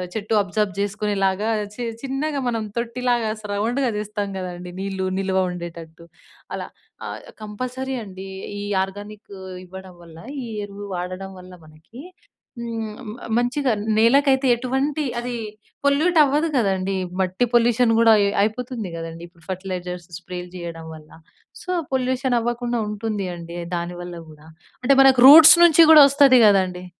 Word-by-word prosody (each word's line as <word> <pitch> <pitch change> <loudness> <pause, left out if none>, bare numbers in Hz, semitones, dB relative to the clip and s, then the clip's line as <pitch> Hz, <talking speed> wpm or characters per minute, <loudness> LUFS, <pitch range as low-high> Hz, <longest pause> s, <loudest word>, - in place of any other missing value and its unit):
చెట్టు 220 0 -3
అబ్‌సార్బ్ 200 0 -2
జేసుకునే 210 +1 -2
లాగా 195 +4 0 0.2
చి 245 - -8 0.2
చిన్నగా 275 +1 -2
మనం 225 -2 -2 0.2
తొట్టిలాగా 240 -1 -1
స - - -9
రౌండ్‌గా 240 +4 0
జేస్తాం 210 -1 -4
కదండీ 180 -1 -7
నీళ్లు 195 -1 -3
నిలువ 190 -1 0
ఉండేటట్టు 170 -1 -9 0.5
అలా. - - -5 0.4
ఆహ్, - - -7 0.2
కంపల్సరీ 255 +5 -5
అండి. 190 -2 -9 0.3
ఈ - - -5 0.2
ఆర్గానిక్ 205 +2 -8 0.3
ఇవ్వడం 190 0 -11
వల్ల, 165 -1 -14 0.3
ఈ - - -6 0.2
ఎరువు 205 0 -9
వాడడం 185 +2 -5
వల్ల 180 0 -13
మనకి 155 +10 -16 0.6
హ్మ్. 225 -2 -5 0.2
మ - - -9 0.2
మంచిగా 250 +2 0 0.3
నేలకైతే 265 +3 +4
ఎటువంటి 265 +5 -2 0.2
అది 245 0 -4 0.5
పొల్యూట్ 315 +5 +2
అవ్వదు 295 +4 +1
కదండీ, 195 -3 0 0.3
మట్టి 185 +6 0
పొల్యూషన్ 240 0 +3
గూడా 230 -1 +6
అయ్ 200 0 +2
అయిపోతుంది 230 -1 -3
కదండీ 165 0 -8
ఇప్పుడు 170 -2 -25
ఫర్టిలైజర్స్ 180 -2 -5
స్ప్రేలు 180 0 -8
జేయడం 165 -2 -7
వల్ల. 155 -1 -16 0.5
సో, 365 - -13 0.2
పొల్యూషన్ 255 -1 0
అవ్వకుండా 240 0 -2
ఉంటుంది 210 -2 -3
అండి 170 0 -9 0.2
దానివల్ల 175 0 -6
గూడా. 155 +1 -16 0.4
అంటే 275 +2 +4
మనకు 265 -2 +5
రూట్స్ 315 +4 +11
నుంచి 335 0 +6
గూడా 300 -2 +10
వస్తది 275 -2 +5
కదండీ. 185 -2 +1
210 Hz, 140 wpm, -22 LUFS, 185-250 Hz, 0.6 s, రూట్స్